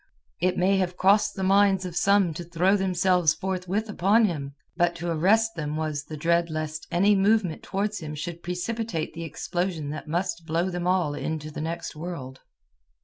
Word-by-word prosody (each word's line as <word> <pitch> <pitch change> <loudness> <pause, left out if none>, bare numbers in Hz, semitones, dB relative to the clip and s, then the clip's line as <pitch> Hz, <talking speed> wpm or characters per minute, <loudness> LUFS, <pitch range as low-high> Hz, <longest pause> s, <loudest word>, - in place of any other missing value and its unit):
It 180 +1 +1
may 190 +2 +3
have 180 -1 -1
crossed 205 +3 +3
the 190 - -3
minds 195 0 +4
of 175 -2 -6
some 195 -3 +3
to 175 - -6
throw 175 +3 +2
themselves 180 -4 +2
forthwith 190 +3 -2
upon 210 +3 +3
him; 140 -7 -3 0.2
but 175 -1 +2
to 170 0 -3
arrest 215 +8 +3
them 150 -2 -4
was 155 -2 -3
the 155 - -7
dread 170 +2 +2
lest 155 0 -4
any 195 +4 +4
movement 195 -3 +2
towards 205 +2 -2
him 155 -2 -6
should 165 +3 -6
precipitate 180 0 -3
the 165 - -6
explosion 170 -2 -3
that 155 - -7
must 170 0 -2
blow 170 +4 0
them 175 0 -3
all 180 -5 +2
into 155 0 -4
the 150 - -6
next 165 +1 -4
world. 150 -6 -7
175 Hz, 180 wpm, -26 LUFS, 160-190 Hz, 0.2 s, minds